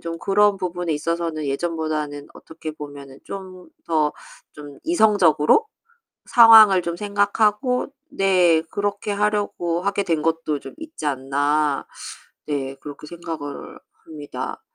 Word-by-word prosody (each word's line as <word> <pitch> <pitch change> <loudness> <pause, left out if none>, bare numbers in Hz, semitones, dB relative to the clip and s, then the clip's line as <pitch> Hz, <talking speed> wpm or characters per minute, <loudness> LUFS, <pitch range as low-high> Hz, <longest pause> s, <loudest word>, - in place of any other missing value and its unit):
좀 165 0 -6
그런 205 0 +3
부분에 175 -3 -3
있어서는 165 0 -2
예전보다는 150 -1 -3
어떻게 160 -1 -9
보면은 145 -2 -10
좀 185 -2 -9 0.2
더 155 -2 +1 0.4
좀 145 -2 -12
이성적으로 210 - +3 0.6
상황을 220 -5 +8
좀 170 0 -3
생각하고 210 +5 +1 0.2
네, 180 -4 +3
'그렇게 205 +1 -2
하려고 205 -4 -1
하게 200 +1 -1
된 165 -4 0
것도 160 -2 -1
좀 - - -10
있지 320 - -9
않나.' 145 +2 0 0.6
네, 135 -2 -3
그렇게 145 +1 -10
생각을 165 -4 -7 0.3
합니다. 150 -3 -7
170 Hz, 260 characters per minute, -22 LUFS, 150-200 Hz, 0.6 s, 상황을